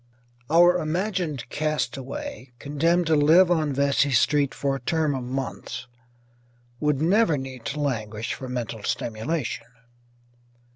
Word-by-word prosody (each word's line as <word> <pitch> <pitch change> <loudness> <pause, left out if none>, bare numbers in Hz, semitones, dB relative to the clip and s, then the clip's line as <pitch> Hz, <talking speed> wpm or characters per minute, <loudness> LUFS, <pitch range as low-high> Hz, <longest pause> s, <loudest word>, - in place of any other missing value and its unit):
Our 175 +3 +6
imagined 170 - -2
castaway, 150 - -3
condemned 165 +6 +1
to 160 -1 +3
live 165 +5 +5
on 155 -4 +2
Vesey 140 +1 +2
Street 140 +3 +3
for 140 -1 -1
a - - -4
term 155 +2 0
of 130 -2 -3
months, 130 0 -5 0.9
would 150 -2 +1
never 170 0 +3
need 130 -3 -7
to 150 - -3
languish 110 -6 -2
for 130 - -7
mental 120 -3 -4
stimulation. 115 +4 -3
145 Hz, 125 wpm, -25 LUFS, 130-165 Hz, 0.9 s, Our